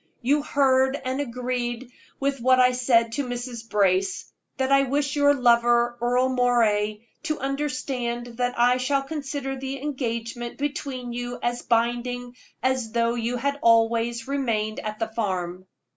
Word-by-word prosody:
You 285 +4 +3
heard 265 -1 +2
and 260 +2 -1
agreed 245 -1 -3 0.3
with 275 -2 -1
what 255 +1 +4
I 250 0 +6
said 240 -2 +2
to 285 +5 -1
Mrs. 245 -2 -6
Brace, 195 -2 +1 0.2
that 265 0 0
I 275 0 +6
wish 280 +2 0
your 285 0 +4
lover, 240 -1 +3
Earle 250 +2 +2
Moray, 230 -4 +1 0.2
to 310 -2 -2
understand 260 -3 -2
that 245 0 -1
I 245 +1 +4
shall 275 +2 0
consider 280 -2 -4
the 270 +1 -5
engagement 240 -4 -4
between 275 -4 -4
you 245 0 -4
as 240 0 -1
binding 240 +1 -1 0.3
as 255 -4 0
though 235 0 +2
you 240 +1 -2
had 280 +3 -1
always 230 0 +3
remained 230 -6 -1
at 215 0 -5
the 225 - -1
farm." 185 -4 -3
245 Hz, 145 wpm, -25 LUFS, 235-270 Hz, 0.3 s, I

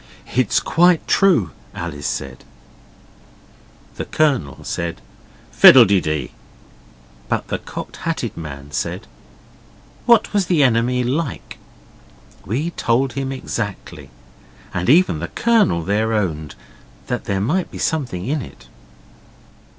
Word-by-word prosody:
'It's 125 -4 +2
quite 175 0 +3
true,' 150 - +3 0.2
Alice 75 -4 -5
said. - - -5 1.5
The - - -4
Colonel 135 - 0
said, 85 0 -4 0.5
'Fiddle - - +9
de 100 -1 +2
dee.' 75 -4 -3 1.0
But - - -2
the - - -2
Cocked - - -8
Hatted - - -3
Man 70 -3 -8
said, 65 - -3 1.0
'What 235 -3 +4
was 200 -3 +1
the 165 -5 +3
enemy 125 0 +2
like?' 135 +3 -3 0.9
We 140 - -2
told 125 -3 0
him 135 +1 -3
exactly. 115 -6 -5 0.6
And 90 +3 -1
even 155 - +4
the 85 - -4
Colonel 215 - +2
then 105 +5 0
owned 80 -9 -2 0.5
there 100 -1 -2
might 155 - 0
be - - -9
something 125 - -2
in 145 +4 -1
it. - - -12
115 Hz, 115 wpm, -20 LUFS, -, 1.5 s, Fiddle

